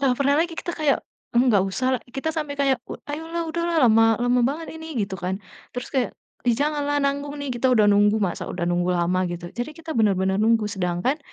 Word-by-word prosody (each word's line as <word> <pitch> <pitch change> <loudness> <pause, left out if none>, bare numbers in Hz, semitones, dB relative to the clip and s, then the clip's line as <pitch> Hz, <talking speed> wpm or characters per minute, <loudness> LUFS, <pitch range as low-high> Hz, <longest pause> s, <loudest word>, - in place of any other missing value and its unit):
Nah, 270 -2 +3
pernah 280 0 +3
lagi 335 +1 0
kita 345 - -3
kayak, 300 -3 +2 0.4
eee, 240 - +5
"Nggak 205 -5 +4
usah" 255 +6 -2 0.3
kita 295 +4 -1
sampai 300 -3 -3
kayak, 275 -3 +2 0.3
"Ayolah, 325 +3 -3
udahlah 340 +1 -1
lama 225 0 +5
lama 245 0 +3
banget 320 +4 -4
ini," 320 -1 -8
gitu 195 -1 -4
kan. 185 +2 -2 0.4
Terus 245 - -5
kayak, 260 -2 +1 0.4
"Ih, 240 - +4
janganlah 290 +1 0
nanggung 280 +1 -1
nih, 280 - -3
kita 245 +1 0
udah 215 -3 +5
nunggu, 205 +1 +4
masa 185 -3 -2
udah 175 - -5
nunggu 175 +1 +1
lama," 180 +1 +1
gitu. 175 0 -6
Jadi 245 +5 -4
kita 325 +1 -10
bener-bener 190 -3 +2
nunggu, 225 0 +3
sedangkan 185 - -1
245 Hz, 200 wpm, -24 LUFS, 200-290 Hz, 0.4 s, eee